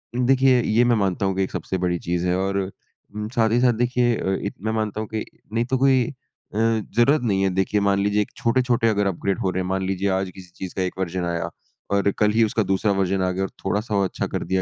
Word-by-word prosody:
देखिए 130 0 +4
ये 115 +1 +3
मैं 120 -1 +4
मानता 100 -2 0
हूँ 95 -1 0
कि 95 - +1
एक 95 - -4
सबसे 90 +1 -3
बड़ी 90 -1 +1
चीज़ 85 +1 -2
है 90 - +2
और 95 +1 -1 0.6
उम, 105 0 -3
साथ 115 -1 +3
ही 120 - +3
साथ 125 -1 +4
देखिए 120 +1 +1
अ, 95 - -1
इ 100 - -2
मैं 110 - 0
मानता 110 -1 -2
हूँ 110 - -5
कि 110 - -1 0.3
नहीं 115 +1 +1
तो 130 +2 0
कोई 130 -1 +4
अ, - - -5 0.5
ज़रूरत 115 +5 +2
नहीं 100 -5 +1
है। 95 - +3
देखिए 95 +2 +1
मान 100 0 +2
लीजिए 105 +1 +2
एक 105 - -4
छोटे-छोटे 120 -1 +2
अगर 105 -2 +1
अपग्रेड 95 +1 -1
हो 95 - 0
रहे 95 - -1
हैं, - - -4
मान 95 0 -1
लीजिए 95 +1 0
आज 95 0 -2
किसी 90 -2 -12
चीज़ 95 -2 -7
का - - -1
एक 90 0 -3
वर्ज़न 90 -1 -2
आया 85 -1 -2 0.4
और 100 0 +2
कल 105 0 +4
ही 115 +2 +3
उसका 110 0 +1
दूसरा 100 +2 +1
वर्ज़न 95 0 +1
आ 90 - +1
गया 95 +1 -2
और 95 - -2 0.2
थोड़ा-सा 105 +2 -1
वो 100 - +3
अच्छा 95 - -2
कर - - -3
दिया 95 +2 0
100 Hz, 260 wpm, -23 LUFS, 95-115 Hz, 0.6 s, देखिए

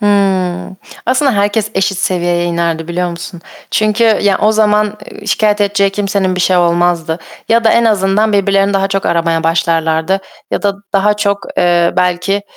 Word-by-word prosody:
Hıı. 190 -3 0 0.3
Aslında 260 +2 +2
herkes 205 +1 0
eşit 190 0 0
seviyeye 175 -2 0
inerdi, 170 -1 -2
biliyor 175 +1 -2
musun? 170 0 -8 0.3
Çünkü, 215 +1 +1
ya 205 -3 +2
o 215 - +2
zaman, 210 -1 +1
eee, 205 - -12
şikâyet 210 0 +1
edeceği 200 -1 +2
kimsenin 195 -2 -1
bir 185 - -2
şey 180 +1 +2
olmazdı. 170 -1 +1 0.3
Ya 230 0 +2
da 225 - +5
en 235 - +3
azından 210 0 +1
birbirlerini 200 0 +2
daha 195 0 +1
çok 195 0 -2
aramaya 165 -1 0
başlarlardı. 165 +2 0 0.3
Ya - - -2
da 200 -1 +1 0.2
daha 205 +1 +2
çok, 200 -1 -2
eee, 175 -1 +2
belki 180 +1 0
e 200 0 -1
195 Hz, 165 wpm, -13 LUFS, 175-205 Hz, 0.3 s, da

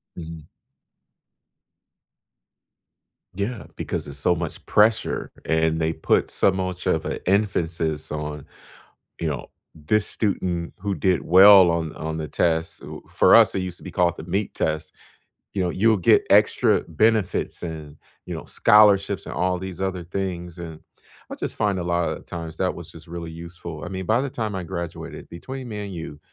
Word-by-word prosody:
Mhm. 80 -2 -9 2.9
Yeah, 105 +3 -3
because - - -4
there's 70 -1 -7
so 90 +4 +2
much 85 -2 -5
pressure, 110 +1 +2
and 80 0 +1
they 80 0 0
put 80 - +1
so 95 - +3
much 95 -1 -3
of - - +1
an - - -3
emphasis 85 -6 0
on, 75 -1 -5 0.8
you 80 - 0
know, 70 -4 -5 0.2
this 90 +7 0
student 90 -5 -2
who 100 0 -2
did 90 -3 +1
well 95 0 +8
on 80 -2 -2
on 80 0 -4
the 80 -1 -4
test, 80 0 0
who - - -9
for - - +5
us, - - +7
it 95 - 0
used 90 -1 -4
to - - -15
be - - -6
called 85 -1 +2
the 80 - -8
MEP 95 +4 -2
test, 80 0 -2 0.6
you 95 - -1
know, 90 - +1
you'll 110 +3 +3
get 90 - +4
extra - - +4
benefits 110 +4 +1
and, 80 -3 -7 0.3
you - - -5
know, - - -6
scholarships 100 -3 +4
and - - -6
all 90 0 +1
these 95 -1 -7
other 95 -2 -2
things, 90 -1 -4
and 80 -2 -8 0.5
I - - -6
just - - -5
find 100 -3 0
a - - -3
lot 85 0 0
of - - -6
times 80 -2 -7
that 95 -1 0
was 85 -2 -10
just 80 0 -14
really 85 -1 -6
useful, 85 -1 -8
I 90 - -5
mean, 95 -1 -5
by 115 +6 +2
the 140 - -2
time 110 -5 -3
I 95 - -3
graduated, 85 -1 -6
between 130 +9 -7
me 105 -3 -5
and 100 - -7
you, 80 -3 -7
85 Hz, 175 wpm, -23 LUFS, 80-95 Hz, 2.9 s, well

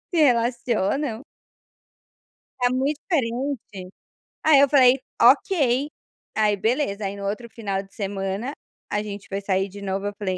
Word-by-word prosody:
se 350 - -3
relacionam. 240 - +1 1.4
Tá 245 0 +3
muito 275 +3 0
diferente. 245 - -2 0.6
Aí 310 -3 +6
eu 280 - +6
falei, 260 -2 +6 0.2
ok. 285 -6 +4 0.5
Aí 210 -1 +3
beleza, 215 -1 0
aí 195 +1 -3
no 200 - -6
outro 215 +4 -4
final 200 -4 -3
de 195 - -22
semana 200 +5 -3 0.4
a 210 0 0
gente 200 -1 -7
foi 195 0 -4
sair 195 0 0
de 200 +2 -10
novo, 195 +1 -2
eu 205 - -4
falei: 185 -3 -2
225 Hz, 145 wpm, -24 LUFS, 200-265 Hz, 1.4 s, Aí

